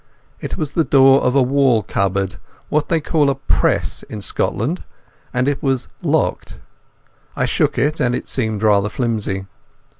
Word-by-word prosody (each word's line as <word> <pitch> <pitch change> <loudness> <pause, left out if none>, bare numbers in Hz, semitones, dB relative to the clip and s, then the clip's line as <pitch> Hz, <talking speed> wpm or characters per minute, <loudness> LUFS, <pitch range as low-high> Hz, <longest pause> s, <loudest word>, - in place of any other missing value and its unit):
It - - -5
was 150 -3 -3
the 165 - +1
door 135 -2 +5
of 125 +1 +1
a 135 - +5
wall 130 -4 +2
cupboard—what 95 - -2
they 165 - +2
call 150 -1 +1
a 135 - 0
"press" 90 - 0
in 105 - -8
Scotland—and 125 - -3
it 145 -1 -1
was 135 -3 -1
locked. - - -1 0.8
I - - 0
shook - - 0
it, 150 +2 +1
and 125 0 +1
it - - -5
seemed 110 -4 -2
rather 105 -1 +3
flimsy. 105 -5 -2
125 Hz, 150 wpm, -19 LUFS, 105-140 Hz, 0.8 s, door